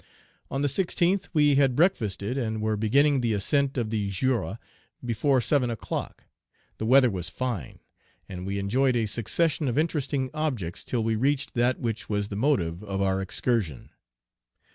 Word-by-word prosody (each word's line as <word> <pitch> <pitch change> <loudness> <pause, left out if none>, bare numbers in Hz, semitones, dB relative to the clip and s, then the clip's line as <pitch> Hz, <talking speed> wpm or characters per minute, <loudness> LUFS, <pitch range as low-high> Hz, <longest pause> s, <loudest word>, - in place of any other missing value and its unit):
On 135 +2 -2
the - - +3
16th, 180 +4 0
we 150 -3 +4
had 135 -3 +3
breakfasted, 120 - +1
and 110 -5 -2
were 110 0 0
beginning 135 +6 +3
the 115 -2 +1
ascent 135 +7 +1
of 115 -3 -1
the 105 -3 -1
Jura 115 0 -1 0.5
before 130 +3 +2
seven 130 0 +1
o'clock. 115 - -5 0.6
The 110 - -2
weather 130 -1 +6
was 90 -3 -4
fine, 110 - -4 0.5
and 90 -2 -7
we 100 0 -2
enjoyed 125 +7 +1
a 115 -2 +1
succession 145 - 0
of 120 - -1
interesting 145 -4 0
objects 130 - -3
till 120 -3 -1
we 110 0 +1
reached 135 +5 0
that 120 +1 +1
which 115 -2 -3
was 105 -1 -1
the 100 - -5
motive 100 - 0
of 100 -2 -4
our 95 -1 +1
excursion. 95 - -2
120 Hz, 165 wpm, -26 LUFS, 105-140 Hz, 0.6 s, weather